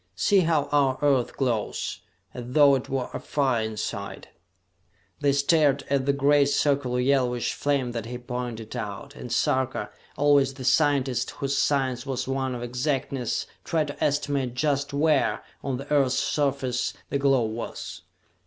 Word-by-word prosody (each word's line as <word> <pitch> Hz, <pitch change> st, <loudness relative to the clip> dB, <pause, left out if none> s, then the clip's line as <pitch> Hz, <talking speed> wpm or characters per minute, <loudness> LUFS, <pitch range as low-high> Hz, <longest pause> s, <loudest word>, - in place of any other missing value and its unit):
"See 200 Hz, -2 st, +3 dB
how 165 Hz, -4 st, +2 dB
our 140 Hz, -3 st, +3 dB
Earth 135 Hz, -4 st, +2 dB
glows, 120 Hz, -6 st, -1 dB, 0.3 s
as 125 Hz, -, -6 dB
though 140 Hz, +2 st, +5 dB
it 130 Hz, -2 st, -1 dB
were 130 Hz, -2 st, -2 dB
afire 130 Hz, -6 st, 0 dB
inside!" 105 Hz, -2 st, -5 dB, 0.9 s
They 145 Hz, -1 st, +3 dB
stared 140 Hz, 0 st, +3 dB
at 135 Hz, -1 st, +1 dB
the -, -, +5 dB
great 140 Hz, 0 st, +3 dB
circular 140 Hz, -4 st, +1 dB
yellowish 125 Hz, -2 st, +1 dB
flame 140 Hz, -4 st, 0 dB
that 115 Hz, -2 st, -5 dB
he 125 Hz, +1 st, -5 dB
pointed 120 Hz, -2 st, -5 dB
out, 115 Hz, +4 st, -6 dB
and 125 Hz, -, -8 dB
Sarka, 130 Hz, 0 st, 0 dB, 0.3 s
always 140 Hz, -2 st, +3 dB
the 130 Hz, -2 st, -7 dB
scientist 135 Hz, -5 st, +2 dB
whose 140 Hz, -1 st, -3 dB
science 130 Hz, -4 st, +1 dB
was 130 Hz, -2 st, -2 dB
one 135 Hz, -1 st, -1 dB
of 120 Hz, -, -5 dB
exactness, 130 Hz, 0 st, -2 dB, 0.2 s
tried 155 Hz, -3 st, 0 dB
to 145 Hz, -, -5 dB
estimate 140 Hz, -3 st, 0 dB
just 140 Hz, 0 st, 0 dB
where, 150 Hz, 0 st, +2 dB, 0.2 s
on 135 Hz, -2 st, -2 dB
the 140 Hz, +3 st, -5 dB
Earth's 135 Hz, -3 st, +3 dB
surface, 135 Hz, -4 st, 0 dB, 0.2 s
the 140 Hz, -, 0 dB
glow 135 Hz, -3 st, +3 dB
was. 110 Hz, +1 st, -6 dB
135 Hz, 150 wpm, -26 LUFS, 125-145 Hz, 0.9 s, though